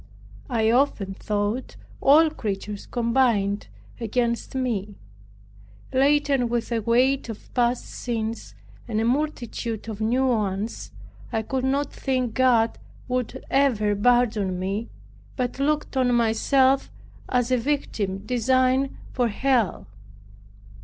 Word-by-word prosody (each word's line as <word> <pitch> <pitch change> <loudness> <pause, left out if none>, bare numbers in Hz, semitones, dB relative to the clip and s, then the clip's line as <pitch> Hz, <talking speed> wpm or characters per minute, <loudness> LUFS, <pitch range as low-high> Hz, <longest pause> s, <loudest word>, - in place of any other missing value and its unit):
I 225 -3 +2
often 235 -7 +1
thought 210 +5 -2 0.3
all 310 +3 +6
creatures 205 -5 -5
combined 230 -4 +1 0.3
against 235 +2 -1
me. 215 -6 -2 1.0
Laden 275 -2 +3
with 235 0 -2
a 230 - +1
weight 250 +4 +2
of 220 - -9
past 245 0 +1
sins, 225 - -4 0.3
and 220 -2 -1
a 225 - +1
multitude 240 -5 -2
of 220 -1 -6
new 245 +5 +2
ones, 215 -3 -1 0.4
I 220 - -1
could 260 +3 -2
not 275 +2 0
think 255 -4 -1
God 240 -3 +3 0.3
would 250 -2 -3
ever 225 -7 +2
pardon 215 -4 +2
me, 195 +5 -3 0.5
but 250 0 -2
looked 300 +1 0
on 250 -2 +3
myself 260 +4 +3 0.4
as 250 0 +1
a 255 - +4
victim 220 -7 -2
designed 255 +3 +2 0.2
for 245 -1 +1
Hell. 235 -1 0
240 Hz, 115 wpm, -24 LUFS, 220-260 Hz, 1.0 s, all